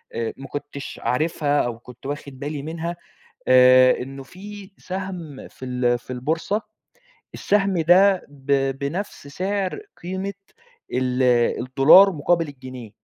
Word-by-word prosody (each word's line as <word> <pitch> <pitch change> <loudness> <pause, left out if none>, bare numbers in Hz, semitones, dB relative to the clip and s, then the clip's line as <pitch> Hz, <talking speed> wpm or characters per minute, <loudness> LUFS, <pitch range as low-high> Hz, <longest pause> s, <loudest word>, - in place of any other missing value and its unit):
أ 115 -1 -2
ما 135 - -9
كنتش 140 -1 -7
عارفها 145 +1 +1
أو 115 -1 -4
كنت 125 +1 -15
واخد 140 -2 -6
بالي 145 -1 -4
منها. 165 +2 -4 0.5
آآ 130 0 +6
إنه 135 +1 -7
في 195 +5 -11
سهم 185 -6 -6
في 130 - -11
ال 125 -1 0
في 125 - -8
البورصة، 160 - -1 0.7
السهم 195 -3 +1
ده 185 +3 +5
ب 135 -1 0
بنفس 155 +2 -4
سعر 190 - -2 0.2
قيمة 190 +2 -4 0.6
ال 130 0 0 0.4
الدولار 145 +10 +7
مقابل 165 +2 +1
الجنيه. 130 -5 -10
145 Hz, 125 wpm, -23 LUFS, 130-185 Hz, 0.7 s, الدولار